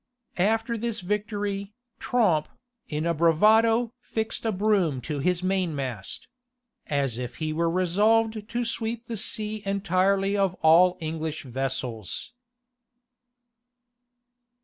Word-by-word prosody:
After 225 Hz, +4 st, +1 dB
this 230 Hz, -2 st, -3 dB
victory, 205 Hz, 0 st, -3 dB, 0.3 s
Tromp, 195 Hz, -11 st, +2 dB, 0.4 s
in 150 Hz, +1 st, -2 dB
a 170 Hz, -, +2 dB
bravado 220 Hz, +8 st, +4 dB
fixed 225 Hz, -1 st, -3 dB
a -, -, +2 dB
broom 190 Hz, -8 st, +1 dB
to 150 Hz, +2 st, -4 dB
his 180 Hz, +4 st, 0 dB
mainmast; 145 Hz, -, -2 dB, 0.6 s
as 135 Hz, -5 st, -1 dB
if 125 Hz, -1 st, -5 dB
he 155 Hz, -1 st, -3 dB
were 165 Hz, +1 st, +1 dB
resolved 210 Hz, +5 st, +2 dB
to 240 Hz, +1 st, -1 dB
sweep 230 Hz, 0 st, -3 dB
the 230 Hz, -, -5 dB
sea 215 Hz, +1 st, -2 dB
entirely 195 Hz, 0 st, +1 dB
of 195 Hz, -2 st, +1 dB
all 175 Hz, +3 st, +6 dB
English 160 Hz, -1 st, -4 dB
vessels. 130 Hz, -, -4 dB
190 Hz, 110 wpm, -26 LUFS, 160-215 Hz, 0.6 s, all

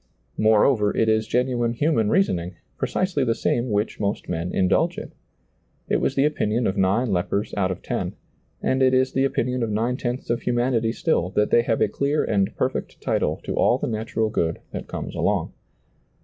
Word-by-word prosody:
More 110 Hz, -1 st, +4 dB
over, 105 Hz, -7 st, +3 dB
it 110 Hz, -, +3 dB
is 110 Hz, 0 st, +2 dB
genuine 125 Hz, -2 st, 0 dB
human 120 Hz, -5 st, +1 dB
reasoning, 90 Hz, -, +1 dB, 0.2 s
precisely 185 Hz, -7 st, -1 dB
the 115 Hz, -2 st, +1 dB
same 120 Hz, +1 st, 0 dB
which 105 Hz, +1 st, -1 dB
most 100 Hz, -1 st, -2 dB
men 85 Hz, +1 st, -3 dB
indulge 95 Hz, -1 st, +1 dB
in. -, -, -7 dB, 0.8 s
It -, -, +3 dB
was 135 Hz, -, 0 dB
the 135 Hz, -, +3 dB
opinion 120 Hz, -6 st, 0 dB
of 95 Hz, -, 0 dB
nine 100 Hz, +5 st, +1 dB
lepers 95 Hz, +3 st, -1 dB
out 95 Hz, -2 st, +1 dB
of 95 Hz, -, -5 dB
ten, -, -, -3 dB, 0.5 s
and 130 Hz, 0 st, +1 dB
it 130 Hz, 0 st, +4 dB
is 130 Hz, 0 st, +2 dB
the 135 Hz, 0 st, +2 dB
opinion 125 Hz, -2 st, -1 dB
of 115 Hz, -, -1 dB
nine 115 Hz, +4 st, 0 dB
tenths 120 Hz, -1 st, -3 dB
of 120 Hz, -, -1 dB
humanity 120 Hz, -2 st, +1 dB
stiU, 115 Hz, -, 0 dB
that 105 Hz, -, +2 dB
they 120 Hz, -, +6 dB
have 115 Hz, -2 st, -1 dB
a -, -, +4 dB
clear 140 Hz, +8 st, 0 dB
and 100 Hz, -3 st, 0 dB
perfect -, -, -2 dB
title -, -, 0 dB
to -, -, -3 dB
all -, -, +3 dB
the -, -, -3 dB
natural 110 Hz, 0 st, -2 dB
good 80 Hz, -4 st, 0 dB
that -, -, -6 dB
comes -, -, -6 dB
along. -, -, 0 dB
115 Hz, 190 wpm, -23 LUFS, 105-130 Hz, 0.8 s, they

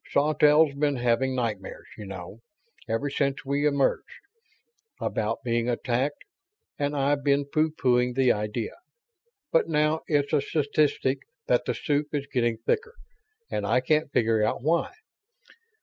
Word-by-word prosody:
Sawtelle's 150 Hz, +1 st, +4 dB
been 145 Hz, 0 st, 0 dB
having 125 Hz, +1 st, +1 dB
nightmares, 110 Hz, -6 st, -4 dB
you 105 Hz, -, -9 dB
know, 95 Hz, +2 st, -8 dB, 0.5 s
ever 115 Hz, +6 st, 0 dB
since 140 Hz, -1 st, -1 dB
we 140 Hz, +2 st, +1 dB
emerged, 140 Hz, -2 st, 0 dB, 0.8 s
about 110 Hz, +1 st, -2 dB
being 120 Hz, 0 st, 0 dB
attacked, 125 Hz, +4 st, -1 dB, 0.6 s
and 145 Hz, 0 st, -1 dB
I've 140 Hz, +1 st, +1 dB
been 140 Hz, 0 st, +2 dB
pooh 155 Hz, +3 st, +1 dB
poohing 125 Hz, -5 st, +1 dB
the 130 Hz, -2 st, +4 dB
idea. 105 Hz, +2 st, -2 dB, 0.8 s
But 165 Hz, -, +2 dB
now 150 Hz, 0 st, +2 dB
it's 145 Hz, -2 st, +1 dB
a 150 Hz, -, +4 dB
statistic 145 Hz, -2 st, 0 dB, 0.3 s
that -, -, +2 dB
the -, -, -1 dB
soup 150 Hz, 0 st, -1 dB
is 140 Hz, -1 st, -2 dB
getting 120 Hz, -5 st, 0 dB
thicker, 455 Hz, -, -2 dB, 0.6 s
and -, -, -2 dB
I 110 Hz, +5 st, +2 dB
can't 150 Hz, +3 st, +1 dB
figure 115 Hz, -3 st, +2 dB
out 110 Hz, -, -1 dB
why. 165 Hz, +3 st, +1 dB
140 Hz, 140 wpm, -26 LUFS, 120-150 Hz, 0.8 s, Sawtelle's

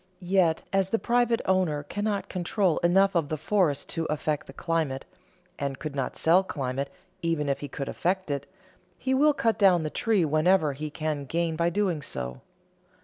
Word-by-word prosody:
Yet, 170 Hz, -4 st, +3 dB
as 195 Hz, -1 st, +2 dB
the 225 Hz, -, +2 dB
private 240 Hz, 0 st, +2 dB
owner 180 Hz, -6 st, +1 dB
cannot 205 Hz, +6 st, -2 dB
control 180 Hz, -1 st, 0 dB
enough 195 Hz, +3 st, +4 dB
of 165 Hz, -5 st, 0 dB
the 155 Hz, -, -2 dB
forest 160 Hz, -3 st, +1 dB
to 165 Hz, -1 st, -2 dB
affect 150 Hz, -1 st, -2 dB
the -, -, -9 dB
climate, 150 Hz, -3 st, -2 dB, 0.5 s
and 140 Hz, -2 st, -2 dB
could 155 Hz, -1 st, -6 dB
not 135 Hz, -2 st, -2 dB
sell 175 Hz, +4 st, +4 dB
climate 135 Hz, -5 st, -3 dB, 0.3 s
even 165 Hz, -3 st, 0 dB
if 140 Hz, -, 0 dB
he 145 Hz, -, -5 dB
could 140 Hz, 0 st, -5 dB
affect 185 Hz, -2 st, -1 dB
it, 140 Hz, 0 st, -3 dB, 0.5 s
he 260 Hz, -, -1 dB
will 295 Hz, +3 st, +5 dB
cut 230 Hz, -5 st, +1 dB
down 185 Hz, -5 st, +5 dB
the 155 Hz, -, -3 dB
tree 215 Hz, -7 st, +2 dB
whenever 155 Hz, +1 st, +3 dB
he 150 Hz, +3 st, -5 dB
can 150 Hz, -1 st, -3 dB
gain 165 Hz, +3 st, -1 dB
by 170 Hz, +1 st, +2 dB
doing 180 Hz, -4 st, 0 dB
so. 65 Hz, -, -5 dB
165 Hz, 180 wpm, -27 LUFS, 145-190 Hz, 0.5 s, will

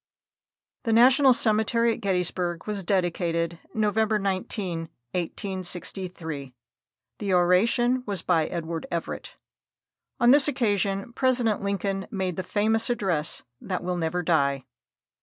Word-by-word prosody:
The 230 Hz, -3 st, 0 dB
National 260 Hz, +4 st, +6 dB
Cemetery 230 Hz, 0 st, +2 dB
at -, -, -8 dB
Gettysburg 180 Hz, -3 st, -1 dB
was 210 Hz, -2 st, -3 dB
dedicated 170 Hz, -2 st, 0 dB, 0.2 s
November 220 Hz, 0 st, +2 dB
19, 185 Hz, -4 st, -2 dB, 0.2 s
1863. 175 Hz, -5 st, -5 dB, 0.6 s
The 200 Hz, -3 st, -1 dB
oration 230 Hz, +8 st, +3 dB
was 200 Hz, -4 st, -3 dB
by 165 Hz, -3 st, +2 dB
Edward 165 Hz, -1 st, -4 dB
Everett. 170 Hz, -1 st, -5 dB, 0.8 s
On 240 Hz, +1 st, +6 dB
this 285 Hz, 0 st, +6 dB
occasion 205 Hz, -5 st, 0 dB
President 245 Hz, -4 st, +1 dB
Lincoln 195 Hz, -1 st, -2 dB
made 190 Hz, -4 st, -2 dB
the 185 Hz, -, -2 dB
famous 220 Hz, +5 st, +1 dB
address 180 Hz, -10 st, -1 dB, 0.2 s
that 185 Hz, -2 st, -3 dB
will 180 Hz, 0 st, -1 dB
never 175 Hz, +1 st, -1 dB
die. 140 Hz, -5 st, +1 dB
190 Hz, 115 wpm, -26 LUFS, 175-220 Hz, 0.8 s, National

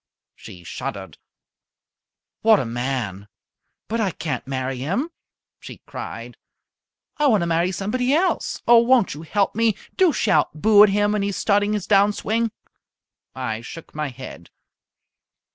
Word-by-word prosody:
She 90 Hz, -2 st, -13 dB
shuddered. 95 Hz, 0 st, -7 dB, 1.2 s
"What 220 Hz, -1 st, +5 dB
a -, -, -2 dB
man! 115 Hz, -5 st, -3 dB, 0.6 s
But 230 Hz, +1 st, -1 dB
I 200 Hz, -, +1 dB
can't 160 Hz, -6 st, -5 dB
marry 130 Hz, -1 st, -3 dB
him," 195 Hz, -, -2 dB, 0.5 s
she -, -, -10 dB
cried. -, -, -8 dB, 0.8 s
"I 295 Hz, -1 st, +3 dB
want 215 Hz, -7 st, +3 dB
to -, -, 0 dB
marry 170 Hz, +2 st, +1 dB
somebody 230 Hz, +7 st, -1 dB
else. 350 Hz, +6 st, 0 dB
Oh, 235 Hz, -1 st, +8 dB
won't 235 Hz, -2 st, +3 dB
you 145 Hz, -, -9 dB
help 195 Hz, +5 st, 0 dB
me? 225 Hz, -1 st, +2 dB, 0.2 s
Do 370 Hz, -3 st, +5 dB
shout 155 Hz, -, +1 dB
'Boo!' 210 Hz, +3 st, +6 dB
at 210 Hz, -, +8 dB
him 205 Hz, +1 st, +2 dB
when 210 Hz, -1 st, 0 dB
he 200 Hz, -, 0 dB
is 200 Hz, -, -4 dB
starting 205 Hz, 0 st, +1 dB
his 210 Hz, -3 st, -2 dB
down 200 Hz, 0 st, +4 dB
swing!" 225 Hz, +2 st, -1 dB, 0.8 s
I 120 Hz, -4 st, -3 dB
shook 165 Hz, +7 st, -10 dB
my 150 Hz, 0 st, -3 dB
head. 125 Hz, -10 st, -10 dB
195 Hz, 150 wpm, -22 LUFS, 135-220 Hz, 1.2 s, Oh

